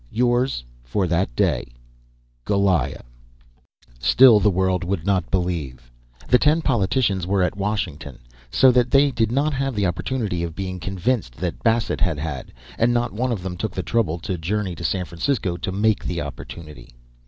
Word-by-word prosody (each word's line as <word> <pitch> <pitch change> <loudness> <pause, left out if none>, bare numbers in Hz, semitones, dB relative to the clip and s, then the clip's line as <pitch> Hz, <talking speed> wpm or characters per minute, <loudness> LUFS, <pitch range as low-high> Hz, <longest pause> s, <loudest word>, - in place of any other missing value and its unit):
"Yours 120 - +1 0.2
for 95 +11 -1
that 85 -7 0
day, - - +1 0.8
"GOLIAH." 95 -9 +1 1.0
Still 120 - +6
the 105 - +3
world 95 -1 +1
would 90 -2 -2
not 100 -2 +1
believe. 75 -10 -3 0.4
The 125 - +5
ten 155 +2 +3
politicians 100 - +1
were 95 -1 +2
at 90 - 0
Washington, 95 -9 -3 0.3
so 130 - +5
that 125 0 +2
they 140 +1 +4
did 115 -3 0
not 145 +4 +1
have 135 -2 -2
the 100 -1 +1
opportunity 95 0 -2
of 85 -1 -4
being 95 -1 -4
convinced 95 - -2
that 85 +3 -4
Bassett 115 -1 +1
had 90 -5 +1
had, 75 -3 -5 0.3
and 115 +1 +3
not 120 -5 0
one 125 +4 -1
of 100 -6 -3
them 95 -2 -4
took 110 +4 -4
the 95 - -3
trouble 105 -9 0
to 90 0 -3
journey 100 +4 -2
out 85 - -8
to - - -6
San 90 +3 -1
Francisco 90 +1 -1
to 90 - -4
make 105 +2 +1
the 85 -1 -3
opportunity. 75 -3 -9
95 Hz, 175 wpm, -22 LUFS, 85-115 Hz, 1.0 s, Still